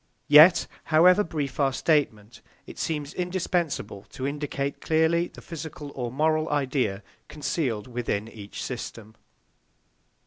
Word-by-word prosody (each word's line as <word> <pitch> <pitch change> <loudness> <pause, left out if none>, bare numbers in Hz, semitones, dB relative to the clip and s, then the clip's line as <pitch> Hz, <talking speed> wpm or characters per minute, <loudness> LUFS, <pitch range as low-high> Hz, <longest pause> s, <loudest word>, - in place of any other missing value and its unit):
Yet, 160 +4 +8 0.2
however 180 +5 +5
brief 150 -7 -4
our 140 -1 +3
statement, 120 -8 0 0.2
it - - -11
seems 150 -2 -3
indispensable 175 - -2
to 130 - -6
indicate 140 -1 -3
clearly 160 +2 +2
the - - -14
physical 155 -3 -8
or 120 -3 -4
moral 155 +3 +1
idea 130 -8 -1 0.2
concealed 140 -7 -2
within 120 -4 -3
each 105 -3 -8
system. 115 -3 -7
145 Hz, 115 wpm, -26 LUFS, 125-160 Hz, 0.2 s, Yet